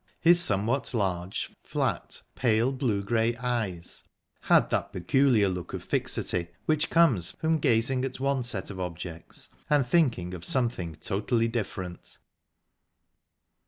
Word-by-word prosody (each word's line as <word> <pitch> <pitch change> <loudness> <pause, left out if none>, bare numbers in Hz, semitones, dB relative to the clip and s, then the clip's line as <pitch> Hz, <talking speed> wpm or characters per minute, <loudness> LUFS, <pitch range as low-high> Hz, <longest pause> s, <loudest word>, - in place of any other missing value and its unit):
His 175 +1 +5
somewhat 115 +4 +2
large, 95 -3 -2
flat, - - -2
pale 120 +1 +2
blue 125 -7 -1
grey 115 +2 +1
eyes 115 -8 -3 0.4
had - - +3
that - - 0
peculiar 115 +3 +3
look 90 -3 -4
of - - -5
fixity 85 -1 -1 0.2
which 155 0 +1
comes 135 - +3
from 160 0 0
gazing 125 -1 +2
at 130 -1 -4
one 135 0 +1
set 110 -5 -3
of 95 - -8
objects 85 -2 -6 0.2
and 145 -3 +3
thinking 120 - +1
of 90 -2 -7
something 105 - -1
totally 110 +7 0
different. 95 -6 -5
115 Hz, 125 wpm, -28 LUFS, 95-130 Hz, 0.4 s, His